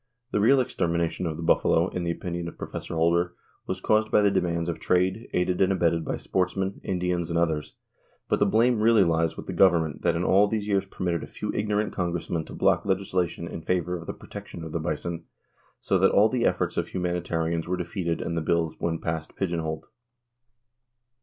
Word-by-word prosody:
The - - +1
real 130 +6 +5
extermination 85 -8 -1
of 80 -1 -3
the 85 - -5
buffalo, 85 +2 +3
in 90 - -3
the 85 - -1
opinion 85 0 -3
of 85 - -9
Prof. - - -7 0.2
Holder, 85 +2 +1 0.3
was - - -3
caused 110 0 +2
by 105 - +4
the 100 - +4
demands 85 -3 0
of 85 - -3
trade, 95 +4 +1
aided 90 +1 0
and 95 0 +4
abetted 85 -3 +1
by - - -3
sportsmen, 95 +1 -1
Indians, 90 -2 -1
and 85 - 0
others; 80 -3 0 0.5
but - - +1
the 105 - +4
blame 115 +3 +3
really 110 -2 +5
lies 80 -2 +1
with - - -7
the - - -5
government 85 -5 +3
that 85 -1 +2
in 85 - 0
all 100 +3 +5
these 105 -1 -2
years 100 -1 +1
permitted 85 -4 -2
a - - -7
few - - -5
ignorant 105 0 0
congressmen 85 -2 -2
to - - -10
block - - +2
legislation 95 -3 -1
in 85 - -6
favor 90 +1 -1
of 85 -1 -8
the - - -3
protection 85 - -9
of 80 - -7
the 85 - -2
bison, 85 +1 -3 0.5
so 95 - +1
that 95 - +5
all 105 +2 +5
the 120 -1 +1
efforts - - -1
of - - 0
humanitarians 85 -2 -2
were 90 +1 -1
defeated 85 -1 -2
and 85 - -3
the 85 - 0
bills 80 0 +1
when 80 -1 -1
passed 80 -1 -4
pigeon 85 -3 -1
holed. 80 -1 -4
85 Hz, 205 wpm, -26 LUFS, 85-95 Hz, 0.5 s, real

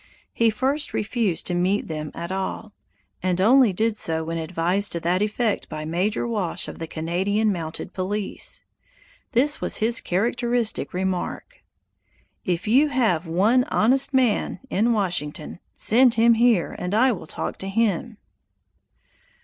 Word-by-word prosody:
He 230 -1 +3
first 270 +7 -1
refused 210 -4 -1
to 180 - -2
meet 185 +4 0
them 155 -2 -4
at 170 +2 -5
all, 195 +3 -4 0.5
and 185 -1 0
only 240 +3 +5
did 220 +3 0
so 160 0 0
when 165 +1 -3
advised 180 +4 -1
to 170 - -2
that 180 +3 +1
effect 215 +1 -1
by 155 0 -5
Major 185 +9 -1
Walsh 205 -7 -1
of - - -8
the 165 - -4
Canadian 190 +7 0
mounted 165 -4 -5
police. 195 +2 -3 0.7
This 280 +5 +2
was - - 0
his 230 +2 +1
characteristic 235 +4 -1
remark: 190 - -3 0.9
"If 180 +1 -2
you 265 +8 +5
have 220 - +1
one 210 +10 +3
honest 260 +6 +2
man 255 -5 +1
in 225 +5 +2
Washington, 175 -7 -2 0.2
send 245 +2 +4
him 230 +1 +5
here 230 -5 +2
and 180 +3 -2
I 255 +4 +4
will 185 -8 -6
talk - - -5
to 195 - -4
him." 220 +1 0
205 Hz, 145 wpm, -23 LUFS, 175-230 Hz, 0.9 s, only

